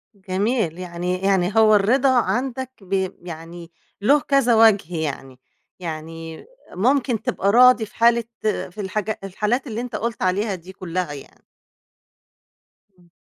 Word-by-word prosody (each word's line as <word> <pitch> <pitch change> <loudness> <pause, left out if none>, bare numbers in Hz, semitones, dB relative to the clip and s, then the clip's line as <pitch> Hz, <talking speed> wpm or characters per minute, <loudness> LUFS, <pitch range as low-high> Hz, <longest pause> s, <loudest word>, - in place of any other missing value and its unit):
جميل. 195 -1 -1
يعني 180 0 -3
يعني 190 -2 +2
هو 215 -1 +6
الرضا 245 +7 +3
عندك 260 +1 -2
بي 190 -1 -1
يعني 170 0 -9 0.3
له 280 +8 +4
كذا 275 -4 +2
وجه 205 -6 +4
يعني، 135 -4 -5 0.4
يعني 165 -1 -7 0.3
ممكن 245 +3 +1
تبقى 200 - 0
راضي 245 0 +6
في - - -19
حالة 235 0 +4 0.2
في 210 -2 -3
الحاجا 210 +2 -3
الحالات 215 +8 -1
اللي 225 0 -4
أنت 245 -2 -6
قُلت 230 +1 -3
عليها 195 +2 0
دي 180 +1 -12
كلها 180 -3 -4
يعني. 140 - -13 1.5
إمم. 175 -1 -24
195 Hz, 130 wpm, -22 LUFS, 175-235 Hz, 1.5 s, هو